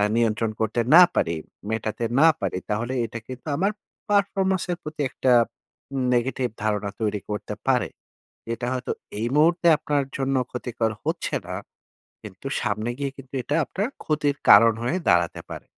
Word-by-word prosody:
নিয়ন্ত্রণ 115 -1 +1
করতে 110 +2 0 0.2
না 180 - +11
পারি, 85 - +1 0.3
মেটাতে 110 +1 -2 0.2
না 160 - +7
পারি, 95 -2 -1
তাহলে 115 +5 -1
এটা 115 +1 -6
কিন্তু 130 -1 -9
আমার 195 +4 +2 0.4
পারফরম্যান্সের 190 -3 +1
প্রতি 150 -1 -5
একটা 130 0 0 0.8
নেগেটিভ 125 0 0
ধারণা 105 -1 0
তৈরি 105 -1 0
করতে 105 0 -4
পারে। - - +3 0.7
এটা 120 - -4
হয়তো 125 -1 -3 0.3
এই 115 - 0
মুহূর্তে 170 +3 +4
আপনার 150 -2 0
জন্য 135 0 0 0.2
ক্ষতিকর 120 -2 -2
হচ্ছে - - -2
না। - - -4 0.7
কিন্তু - - -9
সামনে 110 +3 -1
গিয়ে 140 -1 -2
কিন্তু 135 -1 -13
এটা 145 - -1
আপনার 200 - -2 0.2
ক্ষতির 150 -2 0
কারণ 115 +3 +8
হয়ে 125 +10 0
দাঁড়াতে 85 -1 +2
পারে। - - -8
125 Hz, 150 wpm, -24 LUFS, 110-150 Hz, 0.8 s, না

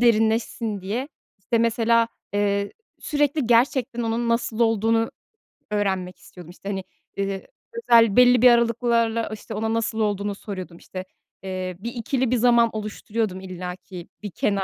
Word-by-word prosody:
derinleşsin 225 -2 +2
diye, 225 +9 -3 0.3
işte, 220 +4 0
mesela, 230 0 +3 0.2
eee, 200 0 0 0.3
sürekli 290 -2 0
gerçekten 240 +1 +2
onun 230 +1 -1
nasıl 230 -1 0
olduğunu 225 0 +2 0.6
öğrenmek 190 -3 -1
istiyordum. 175 -3 -13
İşte, 195 +2 -9
hani, 190 -1 -3 0.4
ııı, 195 -1 -1 0.5
özel 230 -3 +6
belli 245 -1 +6
bir 250 - +9
aralıklarla, 235 -1 +2
işte, 215 - -8
ona 220 +1 -1
nasıl 225 0 -1
olduğunu 205 -1 0
soruyordum, 185 -4 -7
işte, 185 +1 -8 0.4
ııı, 185 -1 -4
bir 235 +4 -5
ikili 250 +1 -1
bir - - +3
zaman 235 -1 +4
oluşturuyordum 215 -1 -3
illa 180 -1 -6
ki 180 -1 -10 0.2
bir 205 - -5
kenar 195 +3 0
225 Hz, 145 wpm, -24 LUFS, 195-235 Hz, 0.6 s, bir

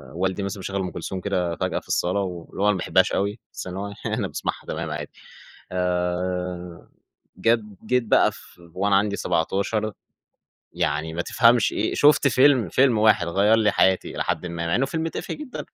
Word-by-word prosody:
والدي 95 +2 -1
مثلًا 100 0 -4
مشغّل 100 +1 -3
أم 90 - -3
كلثوم 95 - -5
كده 90 -4 -1
فجأة - - -2
في - - -23
الصالة 90 +3 0
و 90 -4 -4
اللي - - -6
هو - - +3
أنا 105 - +4
ما - - -2
باحبهاش 95 +1 +2
أوي، 100 +3 -1
بس - - -6
إن 90 - -6
هو 100 +1 -3 0.2
يعني - - -1
أنا - - -1
باسمعها - - -4
تمام 80 0 -4
عادي. 75 -1 -5 0.6
آآ 90 -1 -2 0.5
جد 105 0 +1
جيت 125 -1 +2
بقى 110 - +4
ف - - -13 0.4
وأنا 100 +2 +1
عندي 100 0 +2
17، 100 +5 -1 0.8
يعني 80 +2 -1
ما 85 - -1
تفهمش 115 +3 +3
إيه 105 - -1
شُفت 145 -1 +5
فيلم، 130 -6 +4
فيلم 125 +3 +3
واحد 105 -5 +4
غيّر 100 +6 +3
لي 105 -2 +3
حياتي 95 -1 +2
إلى - - -2
حدِ 90 0 -2
ما، 85 0 -4
مع 85 - 0
إنه 135 - +1
فيلم 160 +3 -2
تافه - - -5
جدًا. 300 -4 -7
95 Hz, 195 wpm, -24 LUFS, 90-110 Hz, 0.8 s, شُفت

